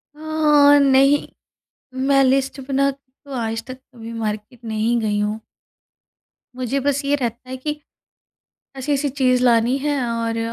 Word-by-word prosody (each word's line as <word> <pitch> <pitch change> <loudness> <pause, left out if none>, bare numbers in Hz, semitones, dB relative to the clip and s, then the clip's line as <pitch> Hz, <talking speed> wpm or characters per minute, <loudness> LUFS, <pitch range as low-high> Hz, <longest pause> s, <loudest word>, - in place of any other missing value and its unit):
अ, 300 -2 +4
नहीं। 275 +1 +4 0.8
मैं 275 -1 +4
लिस्ट 270 +1 +1
बना 275 0 +2
के 275 0 -14 0.2
तो 280 - -11
आज 225 0 -3
तक 255 - -8
कभी 235 -3 -12
मार्केट 220 +1 -5
नहीं 225 +2 0
गई 210 -2 -1
हूँ। 210 +1 -2 1.2
मुझे 255 +2 -1
बस 285 +1 0
ये 285 +1 +2
रहता 245 -1 -4
है 260 - -4
कि, 300 +3 -5 1.0
ऐसी-ऐसी 280 +2 -1
चीज़ 255 -2 +1
लानी 235 +1 +3
है 290 0 -1
और 230 0 -2
260 Hz, 145 wpm, -20 LUFS, 230-280 Hz, 1.2 s, अ